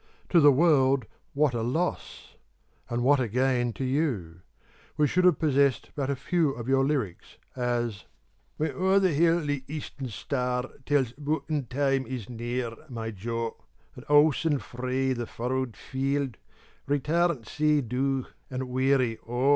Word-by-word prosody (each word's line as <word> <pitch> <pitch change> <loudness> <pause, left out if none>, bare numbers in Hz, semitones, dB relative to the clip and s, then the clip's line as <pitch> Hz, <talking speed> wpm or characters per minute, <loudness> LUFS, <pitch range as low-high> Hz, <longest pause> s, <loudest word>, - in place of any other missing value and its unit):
To 175 - +5
the 145 -2 +8
world 135 -4 +4 0.3
what 145 -2 +2
a 115 - -1
loss! 160 +10 -3 0.5
and 120 0 -1
what 140 +2 +5
a 125 - 0
gain 125 +1 +1
to 135 - -5
you! 125 - -1 0.6
We 150 - +4
should 180 +6 +2
have 180 -4 +5
possessed 140 -3 +2
but 140 -2 -2
a 140 - +1
few 160 +1 +1
of 120 -2 -7
your 135 0 +3
lyrics, 135 - -2 0.2
as 120 -4 -2 0.5
When 155 - 0
o'er 190 +1 +2
the 190 -2 +3
hill 170 +3 +3
the 145 -3 -2
eastern 140 -2 -6
star 125 +2 -2 0.2
Tells 140 -5 +2
bughtin 145 -1 -2
time 135 0 +1
is 125 -3 -6
near, 120 0 -3 0.2
my 115 -3 -4
jo; 115 +3 -4 0.4
And - - -10
owsen 150 +1 +4
frae 130 +3 -2
the 120 -2 -4
furrowed 125 0 -3
field, 135 -1 -2 0.5
Return 150 0 +1
sae 150 +5 +1
dowf 130 +2 -1 0.2
and 130 0 -4
wearie 130 -2 +1
O! 125 +3 +1
135 Hz, 150 wpm, -27 LUFS, 120-145 Hz, 0.6 s, the